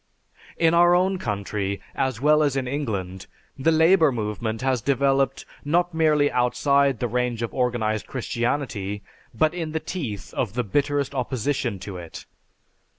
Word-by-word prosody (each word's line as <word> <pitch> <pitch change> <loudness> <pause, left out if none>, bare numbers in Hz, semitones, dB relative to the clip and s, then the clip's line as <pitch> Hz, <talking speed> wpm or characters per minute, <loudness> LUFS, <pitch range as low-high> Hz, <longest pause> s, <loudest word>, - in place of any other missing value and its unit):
In 165 0 +3
our 175 +1 +6
own 185 +1 +1
country, 100 - -3
as 130 -4 -1
well 150 +3 +4
as 145 -3 +1
in 130 -2 -1
England, 100 -10 -4 0.3
the 150 +5 +2
labor 160 -1 +5
movement 110 0 -3
has 130 -3 +1
developed 135 +1 +1 0.2
not 175 +4 +1
merely 155 -3 +3
outside 135 +2 +2
the 120 - 0
range 120 0 -1
of 115 - -4
organized 115 -4 -1
Christianity, 120 -5 -2 0.3
but 155 +7 +1
in 165 -3 -4
the 160 - 0
teeth 130 - -5
of 105 -6 -2
the 125 +1 -1
bitterest 145 +5 0
opposition 130 -3 -1
to 100 -3 -6
it. 85 -2 -9
130 Hz, 150 wpm, -24 LUFS, 110-150 Hz, 0.3 s, our